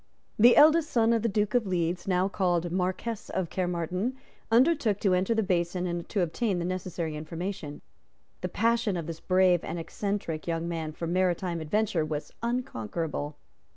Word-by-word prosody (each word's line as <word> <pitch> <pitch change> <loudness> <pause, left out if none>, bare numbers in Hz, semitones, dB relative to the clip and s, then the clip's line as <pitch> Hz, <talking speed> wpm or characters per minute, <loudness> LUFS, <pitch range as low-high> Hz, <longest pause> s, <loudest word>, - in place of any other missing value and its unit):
The 240 +3 +8
eldest 310 +1 +6
son 230 -1 +3
of 230 - +2
the 230 - +1
Duke 210 0 0
of 240 -4 +2
Leeds, 175 0 -1
now 185 0 +2
called 175 -3 0
Marquess 185 +5 -2
of 185 -3 -2
Caermarthen, 180 +6 -1 0.3
undertook 235 -3 +3
to 195 -3 +3
enter 185 +5 +2
the 220 - +2
basin 180 -1 0
and 175 -1 -3
to 205 - 0
obtain 185 +4 0
the 170 - -2
necessary 175 -3 -3
information. 165 0 -5 0.6
The 180 - -2
passion 230 -1 +1
of 165 - -4
this 165 0 -6
brave 185 -2 +3
and 165 - -4
eccentric 170 -2 -3
young 165 0 -1
man 165 -2 -3
for 165 +2 -5
maritime 175 -1 0
adventure 185 +1 0
was 155 -1 -4
unconquerable. 160 - -3
180 Hz, 165 wpm, -28 LUFS, 170-210 Hz, 0.6 s, The